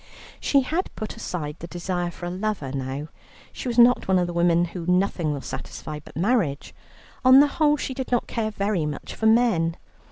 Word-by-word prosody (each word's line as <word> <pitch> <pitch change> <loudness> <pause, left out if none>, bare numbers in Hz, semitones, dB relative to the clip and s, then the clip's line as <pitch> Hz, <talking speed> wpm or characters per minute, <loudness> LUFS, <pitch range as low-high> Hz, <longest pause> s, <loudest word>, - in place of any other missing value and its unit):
She 280 - +3
had 325 +8 -2
put 215 - -5
aside 150 -3 -5
the 170 - -7
desire 175 0 -3
for 175 +1 -8
a 175 - -3
lover 190 -7 -3
now. 135 +2 -4 0.4
She - - -6
was 240 -1 -2
not 245 +1 +5
one 190 -1 +3
of 180 - +2
the 175 - -5
women 170 0 +3
whom 180 +1 0
nothing 180 -5 0
will 140 -2 -3
satisfy 150 +2 -7
but - - -12
marriage; 180 - 0 0.5
on 260 +1 +8
the 285 - +7
whole 295 0 +2
she 265 - -4
did 260 -1 -5
not 245 - +2
care 225 -2 -2
very 200 -6 -1
much 150 - -6
for 220 - 0
men. 220 -8 +3
180 Hz, 200 wpm, -24 LUFS, 165-240 Hz, 0.5 s, on